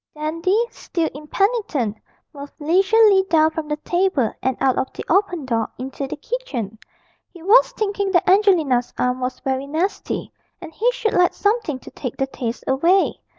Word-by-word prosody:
Dandy, 330 +9 0
still 330 -2 -3
impenitent, 300 - -1 0.4
moved 285 0 -10
leisurely 385 +5 +4
down 315 -1 +4
from 315 -1 -5
the 300 - -1
table 345 - 0
and 260 -1 -1
out 265 -1 +2
of 260 - -2
the - - -7
open 355 -4 +1
door 230 -3 -1
into 265 +2 -5
the - - -5
kitchen. 265 - -5 0.5
He 345 -3 -14
was 435 +7 +5
thinking 405 -2 -1
that 350 - +3
Angelina's 345 - +3
arm 250 0 0
was 255 0 -3
very 265 +1 -2
nasty, 330 +7 -3 0.3
and 320 - -10
he 470 +9 +1
should 455 -3 -2
like 360 0 +3
something 410 - 0
to - - -13
take 250 -4 -6
the 270 - +1
taste 245 -3 -5
away. 335 +9 +2
315 Hz, 165 wpm, -21 LUFS, 265-390 Hz, 0.5 s, was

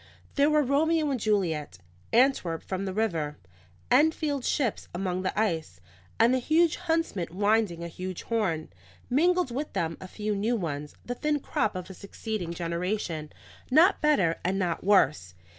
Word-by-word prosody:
There 285 +1 +3
were 300 -1 +4
Romeo 305 +3 +2
and 260 - -1
Juliet, 170 - 0 0.3
Antwerp 235 -10 +2
from 190 +1 -3
the 190 - -2
river, 165 -9 -1 0.5
Enfield's 290 -1 +2
ships 255 -8 -1
among 185 0 -2
the 190 +2 -2
ice, 160 - -1 0.4
and 230 +3 +5
the 260 - +2
huge 315 +5 +3
huntsman 325 - -1
winding 205 -2 +1
a - - -4
huge 185 +1 -6
horn; 185 -9 -1 0.4
mingled 350 +2 +3
with 285 +5 -4
them 165 0 -2
a 185 - -7
few 210 +2 -3
new 220 +5 0
ones, 150 -7 -4
the 245 - -3
thin 300 +3 0
crop 215 -6 -1
of 185 -1 -5
a 190 - -9
succeeding 200 -2 -5
generation, 170 -2 -3 0.4
not 325 +9 +5
better 195 - +3
and 185 +2 0
not 175 -4 -1
worse. 150 - +3
205 Hz, 160 wpm, -28 LUFS, 170-275 Hz, 0.5 s, and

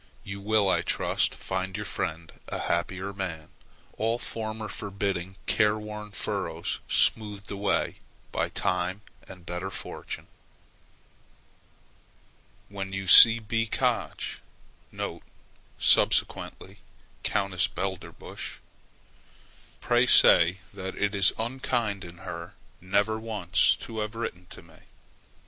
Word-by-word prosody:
You 100 0 -7
will, 105 0 +2
I 95 - +3
trust, - - 0
find 95 0 -4
your 105 - -5
friend 80 -4 -4
a - - -4
happier 95 +3 -2
man, 85 -6 -5 0.5
all 115 +2 +1
former 110 -2 -5
forbidding, 100 -3 -4
careworn 105 0 0
furrows 100 - -3
smoothed 105 -2 +1
away 100 0 -1 0.3
by - - -1
time 90 +2 -2 0.3
and 90 -2 -13
better 90 +2 -4
fortune. - - -7 2.4
When 95 -1 -6
you 95 0 -3
see 110 +5 +11
B. 115 0 -2
Koch - - -2 1.4
[subsequently 95 +1 +2 0.4
Countess 95 -3 0
Belderbusch], 95 0 -6 1.2
pray - - +3
say 85 +2 +7 0.2
that 95 -1 -6
it 100 0 0
is 100 -1 +6
unkind 115 -4 -2
in 85 0 -11
her 85 -2 -7 0.3
never 100 +4 0
once 105 -5 +2
to 110 -1 -6
have 105 +1 -4
written 90 -6 -5
to - - -11
me. - - -19
100 Hz, 105 wpm, -27 LUFS, 95-105 Hz, 2.4 s, see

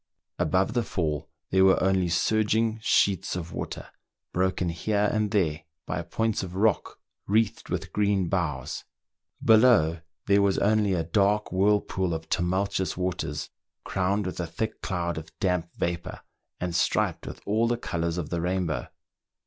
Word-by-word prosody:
Above 95 +5 +2
the 120 - +2
fall 80 -9 -2 0.2
there 95 0 +5
were 95 -1 +5
only 95 -2 +2
surging 110 +5 +1
sheets 95 -4 +2
of 85 -2 -5
water, - - -5 0.5
broken 90 -1 +1
here 105 +5 0
and 110 -1 +1
there 85 -7 +1 0.2
by 85 - -2
points 110 +6 -1
of 90 -1 -6
rock 105 +2 +1 0.3
wreathed 110 +1 +1
with - - -3
green 100 -3 +2
boughs; 80 -8 -2 0.6
below, 110 -8 +5 0.2
there 100 0 +4
was 100 -1 +2
only 105 -1 +2
a 85 -2 0
dark 100 +5 +1
whirlpool 95 -2 +1
of 80 0 -6
tumultuous 95 +1 0
waters, 80 -4 -3 0.3
crowned 100 +2 0
with 90 - -4
a 85 - -2
thick 110 +7 -4
cloud 85 -3 -2
of 80 0 -11
damp 90 -4 0
vapour, 85 0 -3 0.4
and 90 -1 -2
striped - - +1
with - - -7
all 110 +3 +2
the 120 0 +1
colours 85 -6 -2
of 85 -4 -4
the 85 -1 -1
rainbow. 90 -7 -1
95 Hz, 150 wpm, -27 LUFS, 85-105 Hz, 0.6 s, there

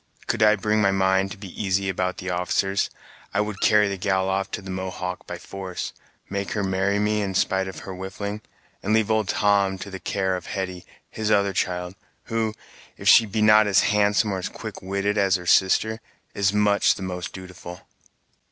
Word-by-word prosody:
Could 115 - -1
I 105 0 +6
bring 105 +1 +1
my 100 - +4
mind 95 0 +2
to 100 - -8
be 100 -1 -9
easy 95 0 +1
about 95 -1 -1
the 95 0 -4
officers, 95 +2 0 0.5
I 105 - +3
would 105 -2 -4
carry 105 -1 +5
the 100 -1 -4
gal 95 0 +1
off 95 0 -1
to - - -5
the 95 - -6
Mohawk 95 -1 -5
by 90 - -5
force, 95 0 -6 0.3
make 100 0 -3
her 105 - -1
marry 95 +1 +1
me 105 +1 +1
in 95 -2 -3
spite 95 +1 +1
of 95 - -7
her 95 - -7
whiffling, 100 +3 -5 0.4
and 110 +3 +1
leave 110 -1 +2
old 110 -2 +1
Tom 100 -2 +2
to 100 +1 -8
the 95 - -6
care 95 0 -1
of 90 - -7
Hetty, 95 -2 -4 0.2
his 110 -1 -2
other 100 -2 +3
child, 90 -1 -2 0.3
who, 110 -1 -2 0.4
if - - -6
she 115 - +8
be 105 +1 0
not 105 0 +6
as 100 -2 +4
handsome 105 +1 +2
or 95 - -2
as 90 - -4
quick - - -8
witted 100 +2 -1
as 95 -1 +3
her 90 -2 -4
sister, 110 +5 +3 0.3
is 100 -1 +2
much 105 0 +3
the 95 - -7
most 90 -1 -4
dutiful." 90 -1 -10
95 Hz, 200 wpm, -24 LUFS, 95-105 Hz, 0.5 s, she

